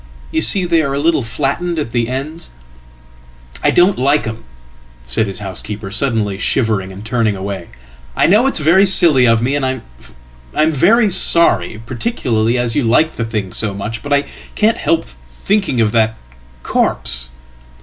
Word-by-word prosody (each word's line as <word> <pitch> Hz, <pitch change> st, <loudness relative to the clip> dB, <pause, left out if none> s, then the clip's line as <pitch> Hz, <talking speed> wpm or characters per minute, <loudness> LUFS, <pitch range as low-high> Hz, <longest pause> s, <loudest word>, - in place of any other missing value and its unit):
You 160 Hz, -, 0 dB
see 185 Hz, +2 st, +4 dB
they 170 Hz, -2 st, +2 dB
are 140 Hz, -2 st, -2 dB
a -, -, -2 dB
little 160 Hz, 0 st, +1 dB
flattened 140 Hz, +8 st, -3 dB
at 145 Hz, -7 st, -3 dB
the 120 Hz, -1 st, -1 dB, 1.5 s
ends.""I -, -, +2 dB
don't 180 Hz, -1 st, +3 dB
like 140 Hz, +3 st, +1 dB
'em," 110 Hz, 0 st, -7 dB, 0.6 s
said 65 Hz, -, +1 dB
his 95 Hz, -, -5 dB
housekeeper, 100 Hz, +1 st, -7 dB
suddenly 105 Hz, -4 st, 0 dB
shivering 105 Hz, -6 st, -1 dB
and 100 Hz, +3 st, -11 dB
turningaway. 100 Hz, -6 st, -3 dB, 0.5 s
"I -, -, +2 dB
know 215 Hz, +8 st, +3 dB
it's 270 Hz, -, 0 dB
very 170 Hz, +6 st, +4 dB
silly 155 Hz, -9 st, +5 dB
of 115 Hz, 0 st, +2 dB
me 135 Hz, +4 st, 0 dB
and 145 Hz, -, -2 dB
I'm 65 Hz, -, -5 dB
very 205 Hz, -, +3 dB
sorry, 170 Hz, -, +4 dB
particularly 120 Hz, -, -2 dB
asyou 120 Hz, +2 st, 0 dB
like 155 Hz, +7 st, +2 dB
the 115 Hz, -, -2 dB
thing 105 Hz, -4 st, -4 dB
so 105 Hz, -3 st, 0 dB
much. 105 Hz, +4 st, -6 dB
But 145 Hz, -, -8 dB
I 140 Hz, 0 st, +2 dB, 0.3 s
can't 220 Hz, +1 st, +1 dB
help 165 Hz, -, 0 dB, 0.3 s
thinking 195 Hz, -, 0 dB
of 110 Hz, -2 st, +2 dB
that 110 Hz, -1 st, 0 dB, 0.5 s
corpse."" 60 Hz, 0 st, -1 dB
120 Hz, 155 wpm, -15 LUFS, 105-160 Hz, 1.5 s, silly